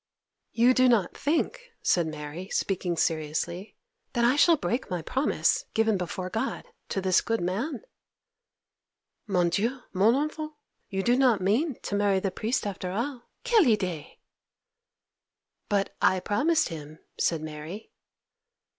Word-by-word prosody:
'You 240 +2 +4
do 255 0 +4
not 215 -7 +2
think,' 400 - -1
said 170 -3 +2
Mary, 155 +4 -7
speaking 180 -3 -1
seriously, 165 +5 -2 0.4
'that 235 -2 +2
I 250 +3 +4
shall 330 +3 +5
break 250 -2 -2
my 180 -3 -3
promise, 270 - +1
given 225 -1 +3
before 185 0 -3
God, 225 +7 -2 0.2
to 195 - -1
this 185 -1 +3
good 225 0 -1
man?' 210 - -2 1.4
'Mon 180 -4 +2
Dieu, 230 +9 -1
mon 205 +6 +4
enfant! 305 +2 -2 0.4
You 195 0 -2
do 240 +3 +3
not 250 -5 +4
mean 230 - +1
to - - -4
marry 200 -1 +2
the 195 0 -2
priest 220 +6 -1
after 190 -2 -4
all! 240 +6 -4 0.2
Quelle 460 -7 +5
idée!' 185 - -1 1.5
'But 200 -1 0
I 185 - +4
promised 310 - +1
him,' 155 -2 -8 0.2
said 165 -2 +1
Mary. 155 +6 -8
205 Hz, 135 wpm, -27 LUFS, 180-255 Hz, 1.5 s, shall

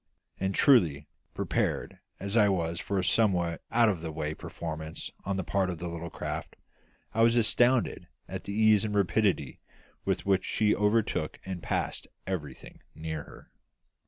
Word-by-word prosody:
And 95 0 -1
truly, 80 - +4 0.3
prepared - - -1 0.2
as 100 +2 -3
I 105 -3 +6
was 85 -3 -1
for 100 - -2
a 95 - +1
somewhat 90 -5 +2
out 115 0 +4
of 95 -6 0
the 80 -1 -4
way 75 0 -3
performance 80 0 -6
on 100 0 -1
the 95 - -1
part 95 +1 0
of 90 - -3
the 85 - -5
little 85 0 -5
craft, - - -5 0.6
I 115 - +1
was 115 +1 +5
astounded 120 +2 +3 0.2
at - - -6
the 100 - -4
ease 110 -1 +5
and 105 -1 -2
rapidity 100 -7 +1 0.4
with - - -1
which 95 -1 +3
she 105 -1 +2
overtook 105 +2 +1
and 95 -2 -5
passed - - -2 0.2
everything 75 -8 -6 0.2
near 80 -1 -5
her. - - -15
95 Hz, 160 wpm, -29 LUFS, 85-105 Hz, 0.6 s, I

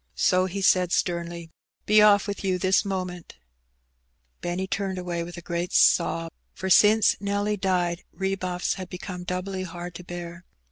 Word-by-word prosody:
So 185 -1 +3
he 195 +2 -4
said 180 -1 +3
sternly— 170 -2 -2 0.3
''Be 215 0 +5
off 205 -1 +5
with 200 0 -5
you 185 -2 +1
this 185 +2 +2
moment! 185 -3 -5 0.5
" 60 0 -46
Benny 175 +2 -2
turned 195 -1 -3
away 175 -2 -3
with 175 +1 -7
a 175 - -9
great 170 0 -3
sob, 165 -1 +3 0.2
for 190 0 -3
since 215 +3 +6
Nelly 205 +1 -1
died 180 -3 -1
rebuffs 190 -2 -2
had 185 - -7
become 180 0 -7
doubly 185 +1 -3
hard 175 -1 -7
to 180 - -9
bear. 175 0 -8
180 Hz, 160 wpm, -25 LUFS, 175-195 Hz, 0.5 s, since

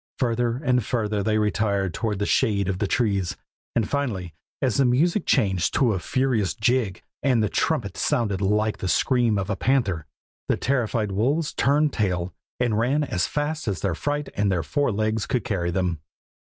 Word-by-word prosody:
Further 120 -1 0
and 125 -2 +1
further 105 -2 -1
they 110 +1 +1
retired 100 -3 0
toward 105 0 -2
the 105 - -1
shade 105 -7 +2
of 95 -1 -2
the 105 - 0
trees, 100 -6 0 0.4
and 115 -3 +1
finally, 105 - -2 0.3
as 130 -5 +1
the 140 - +4
music 160 +11 +2
changed 95 -4 +2
to 125 -6 +3
a 95 - -1
furious 115 - 0
jig, 115 -5 0 0.2
and 125 -5 +2
the 105 - +1
trumpet - - -1
sounded 105 -5 0
out 95 - +1
like 105 +1 +1
the 95 - -3
scream 120 +1 +2
of 100 +1 -2
a - - 0
panther, 100 - 0 0.4
the - - +2
terrified 115 -5 0
wolves 140 +11 0
turned 145 +1 +2
tail 90 -4 -1 0.3
and 120 -3 +1
ran 135 +6 +2
as 90 -10 -1
fast 150 0 -2
as 100 - -2
their 95 -4 0
fright 145 - -2
and 100 -1 +1
their 85 -3 0
four 145 -3 0
legs 110 +1 -1
could 125 - 0
carry 95 -8 -1
them. 90 -3 -1
110 Hz, 185 wpm, -24 LUFS, 100-130 Hz, 0.4 s, the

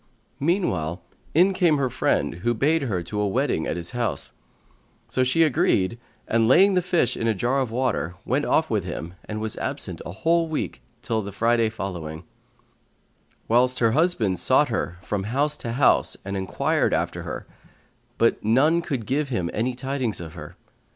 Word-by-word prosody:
Meanwhile 95 - 0 0.4
in 185 +4 +5
came 175 -5 +3
her 130 -3 0
friend - - +1
who 120 +3 +1
bade 155 +7 +2
her 100 -10 -2
to 105 +4 -3
a 105 - +1
wedding 120 - 0
at - - -1
his 85 -1 -5
house; 115 - -2 0.7
so 130 - +1
she 130 +6 +3
agreed 115 -7 +2 0.3
and, 115 0 +2
laying 190 - +6
the 180 - +3
fish 175 -8 +1
in 115 - -2
a 110 - +2
jar 125 +7 +1
of 130 -3 -1
water, 115 -8 -1
went 135 +5 +1
off 160 - +2
with 105 -4 0
him 85 -1 -6
and 110 0 -5
was 110 0 -3
absent - - -3
a - - -7
whole 165 - +1
week 160 -1 -4 0.2
till 115 -2 0
the 100 0 -6
Friday 115 +2 +2
following;[FN#137] 85 -7 -6 1.2
whilst 125 +2 +3
her 115 -2 +3
husband 120 - +1
sought - - +3
her 85 - -2
from 95 +2 -2
house 140 +7 +1
to 115 - -4
house 130 +2 +3
and 100 0 -4
enquired 95 -5 0
after - - -2
her; - - -6 0.7
but 115 - +2
none 140 +10 +3
could 135 -9 -3
give 140 +4 -1
him 90 -9 -2
any 120 +3 -1
tidings 130 -6 -2
of 80 -2 -8
her. 75 -3 -10
115 Hz, 180 wpm, -24 LUFS, 100-140 Hz, 1.2 s, laying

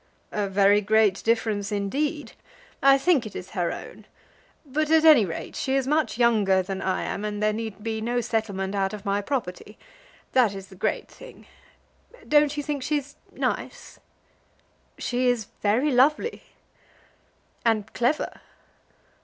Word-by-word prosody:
"A 205 -2 -2
very 200 +1 +4
great 210 -1 +2
difference 220 -3 0
indeed. 280 +10 -2 0.5
I 275 0 +6
think 275 -5 +2
it 210 - -12
is 180 - -7
her 175 -4 -1
own. - - -9 0.6
But, 300 +2 -1
at 320 0 +4
any 295 -10 +7
rate, 165 - -6
she 265 0 -1
is 270 -1 +1
much 300 -2 0
younger 210 -6 +3
than 190 +1 -5
I 190 - -1
am, 200 - -4
and 210 0 -3
there 215 0 +1
need 215 -2 -6
be 220 -1 -3
no 240 +2 0
settlement 215 -5 -2
out 195 -1 -1
of 210 0 -8
my 200 0 0
property. 210 -4 -4 0.5
That 235 -6 +3
is 195 -1 -9
the 190 - -13
great - - -2
thing. - - -14 0.8
Don't 295 0 +3
you 290 - -2
think 290 -1 -3
she's 290 0 -2 0.2
nice?" - - -4 1.0
"She 250 +1 -1
is 240 -4 0
very 235 +9 +2
lovely." 290 - +2 1.2
"And 220 -2 0
clever?" 245 +6 -1
225 Hz, 150 wpm, -25 LUFS, 200-275 Hz, 1.2 s, any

